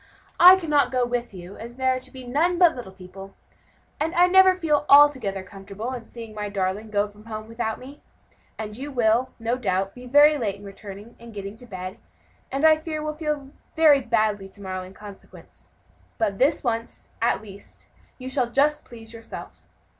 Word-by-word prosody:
"I 365 +2 +10
cannot 300 -6 +1
go 250 -1 +1
with 240 0 -3
you, 185 0 -10
as 235 +1 -9
there 260 0 +1
are - - -3
to - - -10
be 260 -1 -11
none 320 +8 +1
but 345 -2 +5
little 240 -7 -8
people, 190 +1 -12 0.6
and 315 +2 -2
I 350 +1 +6
never 375 +1 +6
feel 315 -5 +1
altogether 260 -10 +5
comfortable 200 +5 -7
in 240 -3 -7
seeing 230 -2 -10
my 210 -1 -4
darling 200 +2 -2
go 205 0 +1
from 210 +1 -18
home 215 -1 -7
without 230 -1 -3
me; 275 +3 -12 0.6
and 215 -1 -6
you 280 +5 -7
will, 240 0 +2
no 230 +2 -1
doubt, 195 -3 -1
be 250 0 -11
very 290 +3 +6
late 210 -5 -2
in 200 - -15
returning 200 +2 -11
and 235 -1 -13
getting 200 0 -6
to 245 - -9
bed, 185 -2 -7 0.5
and 275 +4 0
I 315 0 +7
fear 310 -1 -5
will 305 0 -3
feel 300 -3 -4 0.2
badly 230 -10 +3
to 200 +1 -16
morrow 185 -1 -4
in 185 +1 -11
consequence; 205 -2 -13 0.5
but 205 -4 -1
this 285 +4 +2
once, 230 -2 -4
at 230 -1 +1
least, 200 -1 -12 0.3
you 255 - -8
shall 260 -2 0
just 290 +4 +1
please 225 -2 -11
yourself. 230 0 -10
235 Hz, 190 wpm, -24 LUFS, 205-285 Hz, 0.6 s, I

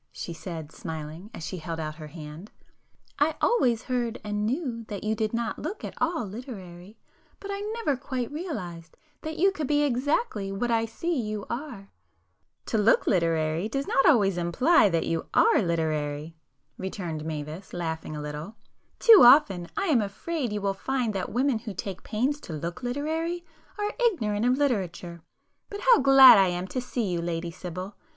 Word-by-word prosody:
she 170 - -6
said, 160 -2 -7
smiling, 160 +5 -7
as 165 - -7
she 185 - -5
held 165 0 -5
out 155 -1 -3
her 155 -2 -8
hand—"I 170 - -6
always 250 - +2
heard 245 -2 -2
and 210 0 -2
knew 250 -3 -2
that 205 -3 -6
you 215 +1 0
did 215 -1 -1
not 235 0 -2
look 360 +8 -5
at - - -5
all 325 -7 0
literary, 195 -3 -9 0.4
but 400 - -6
I 400 - -4 0.2
never 430 -12 0
quite 255 -2 -4
realized 185 - -6 0.2
that 315 +1 -5
you 390 +3 +4
could 310 -7 -4
be 295 +1 +2
exactly 255 - 0
what 235 +5 -1
I 225 0 +2
see 335 +10 -3
you 215 -2 -4
are!" 235 -6 -6 0.7
"To 220 - 0
look 210 +2 +4
literary 165 +1 +1
does 275 +4 -2
not 270 - +2
always 200 - +4
imply 210 - +4
that 165 -2 0
you 165 -1 -2
are 455 - +5
literary!" 155 -3 -2 0.4
returned 175 -5 -4
Mavis, 155 +3 -6
laughing 160 -2 -4
a 150 - -5
little—"Too 185 - +2
often 220 - +6
I 395 - 0
am 290 - +3
afraid 245 +6 -3
you 210 0 -2
will 195 0 0
find 245 +2 -2
that 190 -2 -2
the - - -10
women 255 -1 +1
who 220 -3 -7
take 190 0 -5
pains 255 +7 -1
to 165 - -8
look 170 +8 -5
literary 320 +7 -2 0.3
are 415 0 -2
ignorant 225 - +1
of 250 +1 +3
literature! 180 - -2 0.5
But 405 0 -6
how - - +6
glad 265 -4 +9
I 190 - +5
am 175 0 -2
to 255 - -2
see 245 -2 -2
you, 175 -3 -1
Lady 170 0 -3
Sibyl! 185 +3 -7
210 Hz, 175 wpm, -27 LUFS, 170-270 Hz, 0.7 s, glad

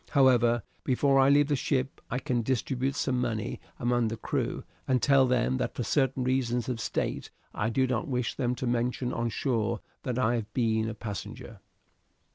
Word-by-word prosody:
However, 120 -5 +4 0.2
before 135 +1 +3
I 135 0 +6
leave 145 +1 +5
the 145 - +2
ship 130 0 -1
I 125 - -1
can 125 -3 0
distribute 130 +2 -1
some 125 -3 0
money 110 -4 -2 0.2
among 120 -1 +1
the 115 +1 -3
crew, - - -2 0.2
and 130 -1 +3
tell 135 0 +4
them 120 - +1
that - - -2
for - - -2
certain 135 -2 +1
reasons 125 -2 0
of 120 -3 -2
state - - -2 0.2
I 105 - -1
do 130 +3 +2
not 125 -3 -1
wish 125 -3 -1
them 125 0 -1
to 125 - -4
mention 125 +1 0
on 115 0 -1
shore 115 -3 -1 0.2
that 125 -2 -3
I 120 -2 +2
have 110 -2 -5
been 110 -2 +1
a 110 - -5
passenger." 105 -2 -7
125 Hz, 185 wpm, -29 LUFS, 115-130 Hz, 0.2 s, I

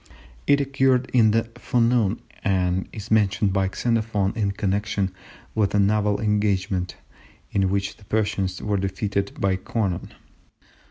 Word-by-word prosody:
It 140 0 +5
occurred 135 -2 +2
in 115 -3 +5
the 115 +1 +2 0.2
forenoon, 115 -3 +2 0.2
and 95 -2 +1
is 110 0 -8
mentioned 105 -2 +3
by 95 -1 +1
Xenophon 110 -3 0
in 105 -3 0
connection 100 -1 -1 0.4
with 105 -2 +1
a - - +4
naval 105 0 +2
engagement 100 -4 0 0.6
in 95 -1 +2
which 100 0 -1
the 105 - -18
Persians 100 -3 -1
were 105 -1 0
defeated 100 +1 -2
by 95 -1 +1
Conon. 95 -2 -2
100 Hz, 130 wpm, -24 LUFS, 95-110 Hz, 0.6 s, It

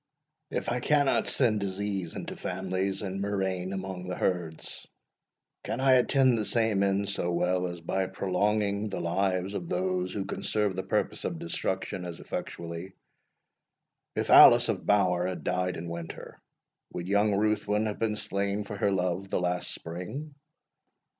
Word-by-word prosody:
If - - -2
I 125 - 0
cannot 145 +2 +2
send 115 -6 +3
disease 100 -2 -3
into - - -5
families, 95 +1 -2
and 95 0 -3
murrain 95 -2 -1
among 95 -1 -5
the 90 - -3
herds, 85 -4 -3 0.8
can 115 - -3
I 135 0 +4
attain 130 +1 +4
the 110 -2 +1
same 110 -2 +1
end 100 0 +1
so 95 -3 -1
well 90 +1 +1
as 85 -1 -7
by 95 +3 -1
prolonging 100 +2 0
the 95 - -4
lives 95 +2 0
of 85 -4 -4
those 90 0 -1
who 100 -2 -3
can - - -5
serve 105 -3 0
the 95 - -1
purpose 100 +3 -1
of 170 - -2
destruction 155 - -3
as 85 -2 -6
effectually? 85 +3 -6 1.2
If - - -1
Alice - - +9
of - - -2
Bower 90 -3 +3
had 90 -5 -4
died 90 +3 -1
in 85 - -6
winter, 85 -1 -7 0.5
would 85 0 -4
young 100 +1 +3
Ruthwin 105 0 +1
have 105 -1 -3
been 110 -2 0
slain 100 0 -2
for 105 +1 -7
her 100 - +2
love 90 0 -1
the - - 0
last 90 0 -1
spring? 90 - -6
95 Hz, 160 wpm, -29 LUFS, 90-105 Hz, 1.2 s, Alice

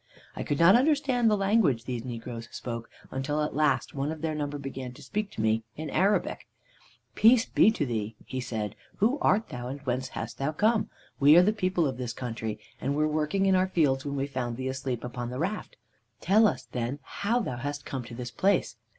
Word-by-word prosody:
"I - - -4
could 145 - -1
not 170 +4 +7
understand 265 -3 +3
the 210 - +3
language 195 - +2
these 120 -3 -3
negroes 120 -1 -6
spoke, 115 -1 -5 0.2
until 140 +3 -1
at 150 - -3
last 140 -4 +1
one 140 +2 -2
of 160 -1 -7
their 160 -1 0
number 145 -1 -3
began 135 -2 -6
to 145 +3 -13
speak 210 +7 -2
to - - -4
me 110 +1 +2
in 155 0 -5
Arabic. 200 +3 +1 0.7
"Peace 230 +1 +6
be - - +5
to 195 -9 0
thee!' 110 -3 -3
he 130 - -4
said. 110 -4 -4 0.2
'Who 240 +8 +2
art 215 +4 +2
thou, 120 0 -5
and 135 +3 -5
whence 130 -1 -2
hast - - -6
thou 140 +3 -1
come? 215 +6 +2 0.3
We 145 +4 +7
are 175 - +8
the 210 +3 +3
people 185 -5 +1
of 130 -4 -2
this 125 -2 -4
country, 115 -4 -4 0.2
and 140 +2 0
were 155 +1 +2
working 155 +6 0
in 190 - +4
our 185 0 +3
fields 145 -7 +2
when 140 -1 -3
we 135 0 0
found 125 -4 -3
thee 130 0 -2
asleep 130 -2 -3
upon 120 -1 -4
the 125 - -5
raft. 190 +9 -3 0.4
Tell 215 +3 +5
us, - - -2
then, 125 +2 -3
how 225 +5 -1
thou 130 - -3
hast 145 +3 -4
come 130 -2 -4
to 115 - -9
this 120 0 -6
place.' 195 - +1
140 Hz, 215 wpm, -28 LUFS, 125-190 Hz, 0.7 s, are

